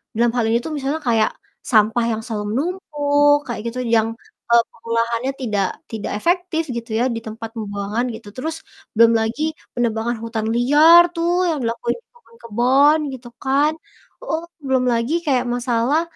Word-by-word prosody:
dalam 235 Hz, +1 st, +2 dB
hal 240 Hz, -, +2 dB
ini 230 Hz, -, +3 dB
tuh 320 Hz, -, -4 dB
misalnya 280 Hz, +3 st, -2 dB
kayak 225 Hz, -2 st, +3 dB, 0.4 s
sampah 225 Hz, +1 st, +4 dB
yang 220 Hz, 0 st, -2 dB
selalu 215 Hz, -4 st, -3 dB
menumpuk, 290 Hz, -, +2 dB
kayak 240 Hz, -, -4 dB
gitu, 245 Hz, +2 st, -4 dB, 0.2 s
yang, 220 Hz, 0 st, +3 dB, 0.4 s
eee, 235 Hz, -, +7 dB
pengolahannya 230 Hz, +2 st, -1 dB
tidak 210 Hz, -6 st, 0 dB, 0.3 s
tidak 220 Hz, -2 st, -4 dB
efektif 350 Hz, -, 0 dB
gitu 235 Hz, 0 st, -6 dB
ya, 240 Hz, -, +2 dB
di -, -, -3 dB
tempat 225 Hz, +1 st, -7 dB
pembuangan 205 Hz, +1 st, -3 dB
gitu. 210 Hz, -, -12 dB
Terus 315 Hz, +5 st, -4 dB, 0.4 s
belum 230 Hz, +1 st, +6 dB
lagi 225 Hz, +6 st, -2 dB, 0.3 s
penebangan 235 Hz, 0 st, -1 dB
hutan 225 Hz, -1 st, -3 dB
liar 300 Hz, +8 st, +7 dB
tuh 335 Hz, +1 st, 0 dB, 0.2 s
yang 315 Hz, -, 0 dB
dilakuin 235 Hz, +1 st, -1 dB
di -, -, -62 dB
kebun-kebun, 280 Hz, -, +2 dB, 0.2 s
gitu 250 Hz, -1 st, -9 dB, 0.2 s
kan. 280 Hz, +3 st, +3 dB, 0.5 s
Oh, 330 Hz, -9 st, -2 dB, 0.2 s
belum 260 Hz, -1 st, +2 dB
lagi, 230 Hz, +6 st, -1 dB
kayak 255 Hz, -4 st, +1 dB
masalah, 245 Hz, +5 st, +1 dB
240 Hz, 155 wpm, -20 LUFS, 230-290 Hz, 0.5 s, eee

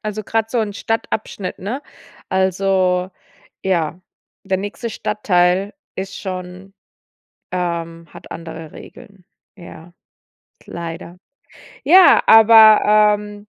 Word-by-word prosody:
Also, 215 Hz, 0 st, -5 dB
grad 225 Hz, +1 st, -2 dB
so 240 Hz, -, -2 dB
'n 210 Hz, -2 st, -3 dB
Stadtabschnitt, 215 Hz, -2 st, -4 dB
ne? 235 Hz, +9 st, -5 dB, 0.5 s
Also, 190 Hz, -1 st, 0 dB, 0.5 s
ja, 175 Hz, -2 st, -1 dB, 0.4 s
der 190 Hz, -1 st, -1 dB
nächste 205 Hz, +4 st, -6 dB
Stadtteil 190 Hz, -2 st, 0 dB, 0.2 s
ist 190 Hz, +1 st, -6 dB
schon 185 Hz, 0 st, -8 dB, 0.8 s
ähm, 170 Hz, -2 st, -4 dB
hat -, -, -14 dB
andere 165 Hz, -1 st, -9 dB
Regeln, 200 Hz, -3 st, -15 dB, 0.3 s
ja, 175 Hz, -1 st, -14 dB, 0.7 s
leider. 170 Hz, +1 st, -8 dB, 0.7 s
Ja, 360 Hz, +5 st, +6 dB
aber 215 Hz, -1 st, +6 dB
ähm 205 Hz, 0 st, -11 dB
190 Hz, 95 wpm, -18 LUFS, 180-210 Hz, 0.8 s, Ja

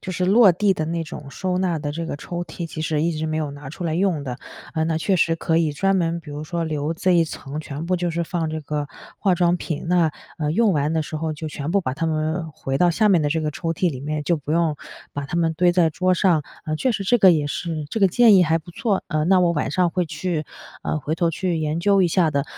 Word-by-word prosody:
就 185 Hz, -, -6 dB
是 180 Hz, 0 st, -1 dB
落 205 Hz, +2 st, +6 dB
地 195 Hz, +2 st, +2 dB
的 155 Hz, -, -2 dB
那 165 Hz, 0 st, -2 dB
种 150 Hz, -3 st, -9 dB
收 180 Hz, +7 st, -2 dB
纳 180 Hz, -3 st, 0 dB
的 145 Hz, -1 st, -4 dB
这 165 Hz, +2 st, -4 dB
个 145 Hz, -, -4 dB
抽 175 Hz, +4 st, -5 dB
屉 170 Hz, -1 st, -6 dB
其 155 Hz, -, -7 dB
实 155 Hz, -1 st, 0 dB
一 170 Hz, +1 st, +1 dB
直 155 Hz, 0 st, -3 dB
没 155 Hz, 0 st, -2 dB
有 155 Hz, -2 st, -2 dB
拿 145 Hz, -1 st, -9 dB
出 175 Hz, -, -7 dB
来 160 Hz, -2 st, -1 dB
用 175 Hz, -5 st, 0 dB
的。 125 Hz, -2 st, -4 dB, 0.4 s
嗯， 160 Hz, 0 st, 0 dB
那 160 Hz, -1 st, 0 dB
确 195 Hz, +4 st, +1 dB
实 165 Hz, -2 st, +2 dB
可 160 Hz, 0 st, 0 dB
以 160 Hz, -3 st, +1 dB
专 195 Hz, +6 st, +1 dB
门 170 Hz, -2 st, 0 dB
比 165 Hz, -3 st, -11 dB
如 145 Hz, +1 st, -5 dB
说 170 Hz, +2 st, -3 dB
留 155 Hz, -1 st, -2 dB
这 180 Hz, +2 st, +1 dB
一 170 Hz, -1 st, +4 dB
层 150 Hz, -1 st, -6 dB
全 150 Hz, +1 st, -6 dB
部 185 Hz, -, +1 dB
就 175 Hz, -1 st, -1 dB
是 170 Hz, +1 st, -1 dB
放 165 Hz, -2 st, -2 dB
这 155 Hz, 0 st, -3 dB
个 145 Hz, 0 st, -3 dB, 0.3 s
化 195 Hz, -3 st, +2 dB
妆 175 Hz, 0 st, +2 dB
品， 160 Hz, -3 st, -4 dB
那， 170 Hz, -3 st, +3 dB, 0.3 s
呃， 150 Hz, -2 st, -1 dB
用 210 Hz, +5 st, +3 dB
完 150 Hz, -1 st, 0 dB
的 160 Hz, -1 st, +1 dB
时 155 Hz, -, -8 dB
候 160 Hz, 0 st, -2 dB
就 155 Hz, +1 st, -6 dB
全 150 Hz, 0 st, -4 dB
部 200 Hz, +3 st, +3 dB
把 130 Hz, -8 st, -3 dB
它 165 Hz, +4 st, -3 dB
们 160 Hz, +1 st, -1 dB
回 135 Hz, -3 st, -3 dB
到 175 Hz, -1 st, +4 dB
下 215 Hz, +5 st, +2 dB
面 180 Hz, -6 st, +4 dB
的 145 Hz, -, +1 dB
这 160 Hz, +2 st, 0 dB
个 155 Hz, -1 st, -1 dB
抽 165 Hz, +2 st, -2 dB
屉 175 Hz, +2 st, +1 dB
里 130 Hz, -4 st, -7 dB
面， 150 Hz, +1 st, -3 dB
就 170 Hz, +2 st, +2 dB
不 150 Hz, 0 st, -8 dB
用 165 Hz, -1 st, +2 dB, 0.4 s
把 145 Hz, 0 st, -4 dB
它 170 Hz, +5 st, -4 dB
们 165 Hz, -1 st, +1 dB
堆 175 Hz, +2 st, +4 dB
在 175 Hz, -2 st, +3 dB
桌 185 Hz, +3 st, +1 dB
上。 175 Hz, -4 st, +3 dB, 0.2 s
嗯， 155 Hz, 0 st, -1 dB
确 255 Hz, -, +1 dB
实 210 Hz, -4 st, -2 dB
这 245 Hz, +5 st, +4 dB
个 190 Hz, -3 st, +7 dB
也 155 Hz, -4 st, +2 dB
是 155 Hz, +1 st, -3 dB
这 225 Hz, -, -2 dB
个 195 Hz, -, +6 dB
建 230 Hz, +3 st, +6 dB
议 185 Hz, -, +7 dB
还 165 Hz, -1 st, +2 dB
不 175 Hz, +2 st, -13 dB
错。 215 Hz, -1 st, -1 dB
嗯， 155 Hz, -1 st, 0 dB
那 190 Hz, -1 st, +5 dB
我 175 Hz, -1 st, +3 dB
晚 150 Hz, -4 st, -1 dB
上 180 Hz, +4 st, +2 dB
会 180 Hz, +1 st, 0 dB
去， 165 Hz, -1 st, -3 dB, 0.4 s
嗯， 155 Hz, -, -1 dB
回 150 Hz, +2 st, -2 dB
头 170 Hz, 0 st, +1 dB
去 170 Hz, +1 st, -1 dB
研 155 Hz, 0 st, -1 dB
究 195 Hz, +2 st, +3 dB
一 180 Hz, -, +3 dB
下 170 Hz, -1 st, +2 dB
的。 140 Hz, -1 st, 0 dB
165 Hz, 305 characters per minute, -22 LUFS, 155-180 Hz, 0.4 s, 个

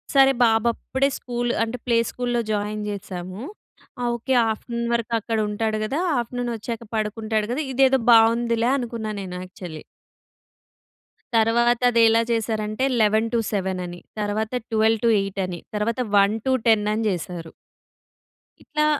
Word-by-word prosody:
సరే 270 Hz, 0 st, +7 dB
బాబు 225 Hz, 0 st, +3 dB
అప్పుడే 270 Hz, +4 st, -1 dB
స్కూల్ 240 Hz, -1 st, -2 dB
అంటే 230 Hz, +2 st, -3 dB
ప్లే 235 Hz, -1 st, +3 dB
స్కూల్‌లో 245 Hz, -1 st, -1 dB
జాయిన్ 210 Hz, 0 st, -2 dB
జేశాము. 185 Hz, -1 st, -6 dB, 0.7 s
ఓకె 240 Hz, +2 st, -1 dB
ఆఫ్టర్నూన్ 235 Hz, +2 st, -3 dB
వరకు 235 Hz, 0 st, -1 dB
అక్కడ 225 Hz, +1 st, -2 dB
ఉంటాడు 215 Hz, +1 st, -1 dB
గదా! 275 Hz, +8 st, -2 dB, 0.2 s
ఆఫ్టర్నూన్ 245 Hz, +1 st, -3 dB
వచ్చాక 230 Hz, +1 st, -5 dB
పడుకుంటాడు 215 Hz, 0 st, -1 dB
గదా! 285 Hz, +6 st, -1 dB
ఇదేదో 265 Hz, 0 st, +4 dB
బావుందిలే 230 Hz, +1 st, +4 dB
అనుకున్నాను 230 Hz, -4 st, -4 dB
నేను 180 Hz, -1 st, -7 dB
యాక్చువల్లీ. 180 Hz, -4 st, -9 dB, 1.5 s
తర్వాత 235 Hz, +2 st, +3 dB
అదేలా 230 Hz, -1 st, +5 dB
చేశారంటే, 220 Hz, +1 st, -1 dB, 0.2 s
11-7 215 Hz, -3 st, +1 dB
అని, 175 Hz, 0 st, -8 dB, 0.2 s
తర్వాత 215 Hz, +1 st, -2 dB, 0.2 s
12-8 220 Hz, -3 st, +2 dB
అని, 175 Hz, -2 st, -6 dB, 0.2 s
తర్వాత, 225 Hz, +4 st, -1 dB, 0.2 s
1-10 220 Hz, +1 st, +2 dB
అని 225 Hz, +1 st, -1 dB
చేశారు. 170 Hz, -2 st, -5 dB, 1.1 s
ఇట్లా 300 Hz, -1 st, 0 dB
225 Hz, 115 wpm, -23 LUFS, 210-235 Hz, 1.5 s, సరే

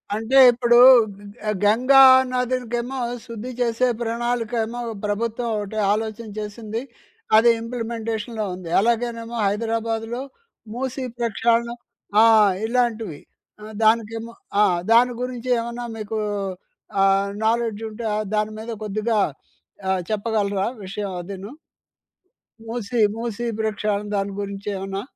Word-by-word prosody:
అంటే 225 Hz, +5 st, +1 dB
ఇప్పుడు 240 Hz, 0 st, +3 dB, 0.7 s
గ 215 Hz, -, 0 dB
గంగా 255 Hz, +6 st, +6 dB, 0.3 s
నదులకేమో 250 Hz, 0 st, -2 dB, 0.3 s
శుద్ధి 230 Hz, +1 st, -7 dB
చేసే 245 Hz, +1 st, +1 dB
ప్రణాళికేమో 235 Hz, 0 st, -2 dB, 0.3 s
ప్రభుత్వం 230 Hz, +3 st, -2 dB
ఒకటి 210 Hz, +1 st, -5 dB, 0.2 s
ఆలోచన 220 Hz, +1 st, -4 dB
చేసింది. 215 Hz, +2 st, -5 dB, 0.6 s
అది 235 Hz, +2 st, +6 dB
ఇంప్లిమెంటేషన్‍లో 230 Hz, -2 st, -4 dB
ఉంది. 180 Hz, -2 st, -9 dB
అలాగేనేమో, 235 Hz, +1 st, -1 dB
హైదరాబాద్‍లో 225 Hz, +2 st, -2 dB, 0.5 s
మూసి 260 Hz, +1 st, -4 dB, 0.2 s
ప్రక్షాలన 235 Hz, 0 st, +1 dB, 0.5 s
ఆ! -, -, +7 dB, 0.4 s
ఇలాంటివి. 225 Hz, -8 st, -1 dB, 0.4 s
ఆహ్, 215 Hz, +1 st, -9 dB
దానికేమో 225 Hz, +1 st, +1 dB, 0.3 s
ఆ! -, -, +6 dB, 0.3 s
దాని 245 Hz, +2 st, +5 dB
గురించి 250 Hz, 0 st, -4 dB
ఏమన్నా 235 Hz, +1 st, -5 dB
మీకు 215 Hz, 0 st, -4 dB, 0.8 s
ఆహ్, 195 Hz, 0 st, +3 dB, 0.2 s
నాలెడ్జ్ 225 Hz, -1 st, 0 dB
ఉంటే 220 Hz, +1 st, -7 dB, 0.3 s
దాని 210 Hz, 0 st, 0 dB
మీద 225 Hz, +2 st, -6 dB
కొద్దిగా 215 Hz, +2 st, -1 dB, 0.7 s
ఆహ్, 190 Hz, -1 st, +1 dB
చెప్పగలరా? 205 Hz, -2 st, 0 dB, 0.2 s
విషయం 195 Hz, +1 st, -4 dB
అదీను. 195 Hz, +5 st, -8 dB, 1.1 s
మూసీ 230 Hz, 0 st, -3 dB, 0.2 s
మూసీ 230 Hz, 0 st, -4 dB
ప్రక్షాలన 210 Hz, -1 st, -1 dB
దాని 200 Hz, 0 st, -1 dB
గురించేమన్నా 195 Hz, -1 st, -4 dB
225 Hz, 105 wpm, -22 LUFS, 210-235 Hz, 1.1 s, ఆ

